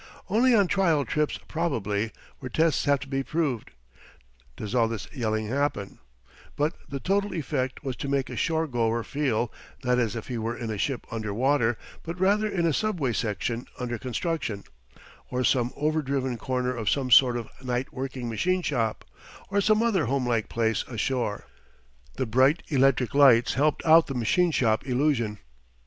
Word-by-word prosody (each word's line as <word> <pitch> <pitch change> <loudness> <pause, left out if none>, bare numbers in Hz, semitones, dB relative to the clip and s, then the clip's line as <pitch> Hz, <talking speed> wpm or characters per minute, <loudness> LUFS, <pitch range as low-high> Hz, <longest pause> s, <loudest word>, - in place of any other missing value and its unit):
Only 240 +4 +4
on 200 -3 +5
trial 170 -7 +2
trips, 150 -1 0
probably, 115 - -1 0.3
where 130 - -6
tests 160 +3 +2
have 140 -1 +3
to 140 - -7
be 135 0 -1
proved, 140 -5 -2 0.9
does 105 0 -6
all 120 -2 +3
this 110 -2 -5
yelling 110 -4 -1
happen; 130 -5 -2 0.6
but 150 +3 0 0.2
the 140 0 -4
total 200 +5 0
effect 130 -4 -2
was 135 -3 -3
to - - -4
make 140 -1 0
a - - -7
shore 160 0 0
goer 115 -4 0
feel, 125 -5 -1 0.3
not 125 0 +2
as 115 -2 0
if 115 - -6
he 120 -3 -3
were 115 +2 -3
in 115 -2 -4
a 105 - -3
ship 130 +4 -2
under 110 -2 -3
water, 120 -2 +2 0.2
but 170 +2 -6
rather 205 +3 +3
in 175 -5 0
a 165 - +2
subway 170 - 0
section 115 +3 -2
under 120 -2 -3
construction, 130 - -3 0.7
or 125 0 -1
some 125 -1 +2
overdriven 140 -4 -1
corner 125 +1 -2
of 110 -4 -1
some 130 -3 0
sort 125 0 +7
of 115 - -5 0.2
night 125 +1 -2
working 130 -2 -4
machine 180 +11 0
shop, 115 -8 -1 0.5
or 200 0 +2
some 215 +2 +3
other 200 - +2
homelike 120 -3 0
place 115 -1 0
ashore. 120 -2 -2 0.7
The 130 - -1
bright 130 +7 +3
electric 135 -4 +2
lights 135 -5 +6
helped 145 +3 +1
out 160 0 +7
the 135 - -4
machine 170 - +2
shop 115 -8 +1
illusion. 125 -5 +1
130 Hz, 170 wpm, -26 LUFS, 115-155 Hz, 0.9 s, sort